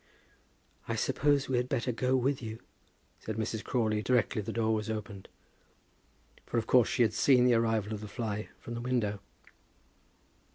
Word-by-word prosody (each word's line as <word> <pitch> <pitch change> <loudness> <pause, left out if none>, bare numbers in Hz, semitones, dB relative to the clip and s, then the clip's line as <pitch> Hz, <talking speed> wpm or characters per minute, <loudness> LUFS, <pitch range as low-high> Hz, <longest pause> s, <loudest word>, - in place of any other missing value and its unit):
"I - - -1
suppose 145 -1 +1
we 130 - 0
had 125 +1 -1
better 125 +1 0
go 125 +2 +1
with 130 +2 +1
you," 110 -1 -6 0.6
said 110 - -5
Mrs. 110 0 -3
Crawley 110 -4 0
directly 115 -2 +1
the 110 +2 -5
door 110 -1 +1
was 110 0 -2
opened; 105 -3 -6 1.1
for - - -3
of 115 - 0
course 125 -1 +4
she 125 - +3
had 110 -2 +1
seen 125 +2 +4
the 125 - +5
arrival 115 -2 +1
of 105 - -5
the 105 - -6
fly 105 -1 -4
from 120 - -8
the 120 - -4
window. 120 -5 -1
115 Hz, 170 wpm, -30 LUFS, 110-125 Hz, 1.1 s, the